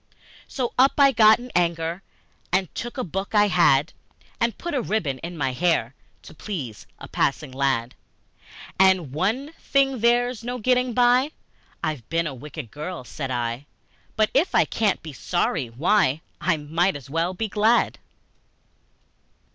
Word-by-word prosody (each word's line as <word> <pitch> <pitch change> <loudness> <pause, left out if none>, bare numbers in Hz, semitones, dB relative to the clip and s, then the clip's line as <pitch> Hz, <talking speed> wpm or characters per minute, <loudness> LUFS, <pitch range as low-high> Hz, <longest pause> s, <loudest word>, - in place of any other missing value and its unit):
So 250 -4 -3
up 270 +2 +6
I 280 -1 +6
got 220 -3 +6
in 245 +1 -10
anger, 170 0 0 0.5
And 185 -1 0
took 240 +3 -6
a 255 - -1
book 195 +4 -4
I 205 0 +5
had, 165 -5 +3 0.5
And 235 -3 0
put 345 - -5
a 270 - +1
ribbon 170 - -2
in 170 0 -7
my 135 -3 -1
hair 155 -5 +1 0.3
To - - -12
please 150 - -6
a - - -10
passing 140 0 -1
lad. 130 -3 0 0.9
And, 190 -7 +4
"One 225 - -1
thing 270 -2 +1
there's 240 +1 +2
no 245 +1 -3
getting 250 0 +1
by 250 +4 +3 0.5
I've 150 -8 -3
been 165 0 0
a 150 - -3
wicked 140 -2 -9
girl," 155 +1 -6
said 130 +3 -6
I; 120 +2 -3 0.5
"But 215 -1 +2
if 295 +7 +2
I - - +5
can't 215 -4 0
be 155 -2 -8
sorry, 155 -3 -1
why, 150 - +2 0.2
I 170 0 +1
might 165 +5 0
as 140 -2 -9
well 165 +5 -1
be 220 +3 -2
glad!" 215 +3 +2
180 Hz, 155 wpm, -24 LUFS, 145-235 Hz, 0.9 s, up